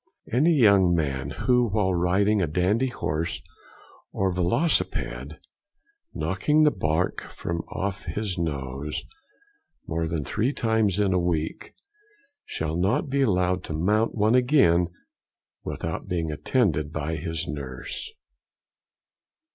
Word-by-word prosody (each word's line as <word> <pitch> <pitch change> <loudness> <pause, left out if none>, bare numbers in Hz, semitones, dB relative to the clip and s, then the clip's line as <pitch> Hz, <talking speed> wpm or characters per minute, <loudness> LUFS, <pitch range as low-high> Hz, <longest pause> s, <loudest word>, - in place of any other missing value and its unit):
Any 155 +8 +4
young 100 - +5
man, 70 -4 -1 0.2
who 125 -2 +3
while 100 -2 +1
riding 95 +4 +2
a 85 - +1
dandy 95 - +1
horse 85 -8 -2 0.7
or 95 -1 0
velocipede, 85 - 0 0.7
knocking 150 +12 +1
the 150 - +5
bark 85 -3 -1
from 85 -1 -4
off 95 0 -4
his 105 -4 -2
nose 70 -3 -3 0.8
more 80 0 -2
than 80 -2 -2
three 120 +7 0
times 110 -6 +1
in 100 -2 +2
one 90 -1 +1
week, 80 -2 -3 0.7
shall 80 0 -3
not 95 +10 +1
be 140 0 +2
allowed 90 -6 +1
to - - -5
mount 105 +8 +1
one 110 +1 +3
again 125 - +4 0.8
without - - -4
being 85 -3 -1
attended 75 - 0
by 80 +1 -3
his 80 0 -3
nurse. 70 -3 -5
90 Hz, 120 wpm, -25 LUFS, 80-110 Hz, 0.8 s, young